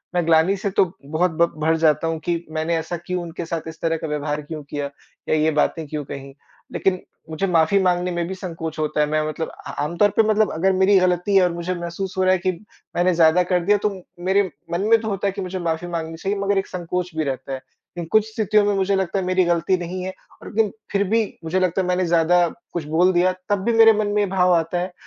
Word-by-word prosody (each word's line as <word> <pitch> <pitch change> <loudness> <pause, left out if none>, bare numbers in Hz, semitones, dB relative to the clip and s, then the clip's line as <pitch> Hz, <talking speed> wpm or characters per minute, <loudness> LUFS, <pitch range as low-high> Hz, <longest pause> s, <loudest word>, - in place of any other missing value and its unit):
मैं 175 -2 +1
ग्लानि 165 +4 +4
से 200 +1 -2
तो 190 -2 +2
बहुत 160 +5 0
ब 170 - +4
भर 160 +1 +2
जाता 160 0 +2
हूँ 165 -1 -2
कि 170 -1 -1
मैंने 160 +1 -1
ऐसा 165 +2 -4
क्यों 180 0 -2
उनके 170 0 -6
साथ 165 -1 -4
इस 160 0 -9
तरह 165 -1 0
का 160 - -5
व्यवहार 150 0 -2
क्यों 150 0 -7
किया? 145 0 -4 0.4
या - - +3
ये 155 +1 +2
बातें 155 +2 0
क्यों 150 0 -4
कहीं? 135 0 -8 0.4
लेकिन 185 -1 +1 0.3
मुझे 160 +5 -1
माफ़ी 170 +1 +3
माँगने 180 0 +1
में 175 -1 -2
भी 190 - -5
संकोच 165 -4 -6
होता 155 0 -1
है - - +4
मैं 155 +1 +1
मतलब 160 +1 -3
अ, - - -10
आमतौर 170 +7 +2
पर 225 - +5
मतलब 215 -2 +3
अगर 185 +5 +1
मेरी 190 +2 +4
गलती 180 +2 +1
है 190 - +6
और 180 - +2
मुझे 170 +1 -3
महसूस 175 +2 -5
हो 185 - +2
रहा 185 - +4
है - - +3
कि 185 +2 0 0.4
मैंने 180 +1 +3
ज़्यादा 165 +2 +5
कर 180 0 +1
दिया 205 +2 +4
तो - - +4 0.4
मेरे 195 +2 +3 0.3
मन 170 - 0
में 230 0 +6
तो 220 - -5
होता 200 -1 -1
है - - +1
कि 195 +1 -6
मुझे 185 0 -4
माफ़ी 170 0 -2
माँगनी 165 -2 -4
चाहिए 195 +4 -2
मगर 200 0 +1
एक 195 - 0
संकोच 180 0 -4
भी 160 - 0
रहता 135 -1 -4
है। 130 - -5 0.4
इन 170 - -3
कुछ 215 -1 +4
स्थितियों 215 -1 +2
में 205 - +2
मुझे 195 0 +1
लगता 190 0 -1
है 190 - -3
मेरी 185 0 +2
गलती 175 +2 +1
नहीं 180 +1 -5
है, 190 0 -4 0.3
और - - -10
लेकिन 215 -2 +2 0.2
फिर 200 0 +2
भी 225 +1 +3 0.2
मुझे 165 +3 0
लगता 185 0 +1
है 180 - -2
मैंने 180 0 +1
ज़्यादा 170 +1 +3 0.3
कुछ 170 - -2
बोल 170 +4 +3
दिया, 180 +1 +3 0.2
तब 205 -2 +1
भी 235 - +2
मेरे 225 0 +7
मन 215 -1 0
में 205 0 +1
ये - - +2
भाव 180 -1 +3
आता 165 +1 0
है, 180 +1 -4
175 Hz, 255 wpm, -22 LUFS, 160-190 Hz, 0.4 s, मेरे